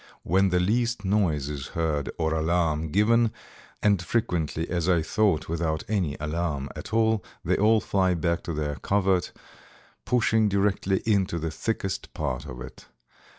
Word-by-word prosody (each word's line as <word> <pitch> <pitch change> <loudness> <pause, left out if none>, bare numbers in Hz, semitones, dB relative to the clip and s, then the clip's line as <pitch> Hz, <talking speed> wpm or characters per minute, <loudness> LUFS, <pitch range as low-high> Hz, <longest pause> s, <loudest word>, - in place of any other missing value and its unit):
When 95 +3 +3
the 90 0 +2
least 115 +3 0
noise 90 -8 +1
is 70 -3 -5
heard 75 -4 0
or 80 -1 0
alarm 80 -1 +1
given, 115 +5 +3 0.5
and 100 -3 +3
frequently, 85 -5 -1
as 85 0 -1
I 85 -3 +3
thought, 100 -1 +1
without 80 -1 -1
any 90 -9 -1
alarm 75 -2 -2
at 110 - -8
all, 110 -1 +2 0.2
they - - +2
all 110 +2 +4
fly 95 -3 +1
back 85 +1 0
to 85 - -3
their 75 -2 -2
covert, 95 +2 +1 0.7
pushing 110 -3 +2
directly 100 -1 +1
into 100 -6 +1
the 80 -1 -3
thickest 95 +2 -3
part 65 -5 -3
of 60 -1 -8
it. 65 - -10
90 Hz, 150 wpm, -26 LUFS, 80-105 Hz, 0.7 s, all